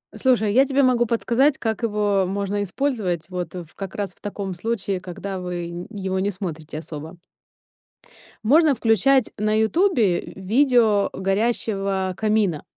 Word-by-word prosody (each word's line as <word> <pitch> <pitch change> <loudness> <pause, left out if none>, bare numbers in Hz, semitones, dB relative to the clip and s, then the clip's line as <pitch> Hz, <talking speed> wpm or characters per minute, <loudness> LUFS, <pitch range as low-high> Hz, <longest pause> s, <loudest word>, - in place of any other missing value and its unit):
Слушай, 225 -6 +2
я 260 +4 +6
тебе 275 0 +2
могу 245 -2 +3
подсказать, 240 +5 +2
как 220 0 -2
его 205 -3 +1
можно 200 +1 -2
использовать, 205 - -1
вот, 180 -2 -5
ф 170 -3 -8
как 195 -2 -7
раз 200 -3 -3
в - - -32
таком 200 -2 -4
случае, 200 0 -2
когда 185 +2 -6
вы 175 -1 -4
н 175 +1 -7
его 190 -3 -3
не 195 +2 0
смотрите 165 -6 -6
особо. 160 +2 -8 1.3
Можно 295 +4 +5
включать 230 +3 +3
на 215 +1 +1
"Ютубе" 220 - +2
в - - -11
видео 225 -1 +3
горящего 195 -2 -1
камина. 210 -7 +1
205 Hz, 145 wpm, -23 LUFS, 185-230 Hz, 1.3 s, я